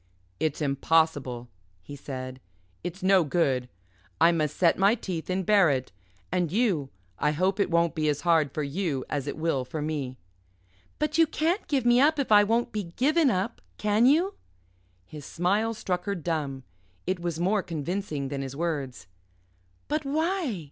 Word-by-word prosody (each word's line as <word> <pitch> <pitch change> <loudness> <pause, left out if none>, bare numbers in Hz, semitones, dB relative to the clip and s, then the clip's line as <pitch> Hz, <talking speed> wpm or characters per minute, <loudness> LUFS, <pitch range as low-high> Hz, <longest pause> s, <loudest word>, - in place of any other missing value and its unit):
"It's 155 0 -1
impossible," 140 -3 +1 0.4
he 145 - -9
said, 130 -2 -7 0.4
"it's 180 +2 -6
no 190 -1 +5
good. 135 -6 0 0.5
I 170 - +6
must 155 -4 -1
set 170 -1 +3
my 200 +4 +5
teeth 185 -8 -5
and 185 0 -1
bear 200 -4 +5
it. 130 -2 -1 0.4
And 175 -4 0
you 190 - +1 0.3
I 150 - +2
hope 185 +6 0
it 200 - +2
won't 170 -1 +2
be 155 -2 0
as 145 -1 -1
hard 165 -5 +3
for 150 - -3
you 145 -2 -2
as 145 -2 -2
it - - -4
will 160 -5 0
for 130 +5 -6
me." 145 -4 -3 0.8
"But 305 +1 -1
you 330 - +6
can't 330 +6 -1
give 270 -5 0
me 240 +1 +5
up 305 +2 +4
if 275 -5 -2
I 205 -1 +8
won't 230 +3 +1
be 210 -2 -3
given 280 - +2
up, 185 -3 -2 0.2
can 210 +3 +3
you?" 340 +8 +3 0.7
His 150 +8 -10
smile 205 +9 0
struck 180 -4 -3
her 200 -1 -1
dumb. 150 -6 -3 0.4
It 185 0 -1
was 170 -2 -3
more 195 +4 +2
convincing 160 -3 -3
than 140 -1 -3
his 135 0 -6
words. 140 - -3 0.8
"But 305 +1 -1
why?" 315 - -1
170 Hz, 170 wpm, -27 LUFS, 145-210 Hz, 0.8 s, I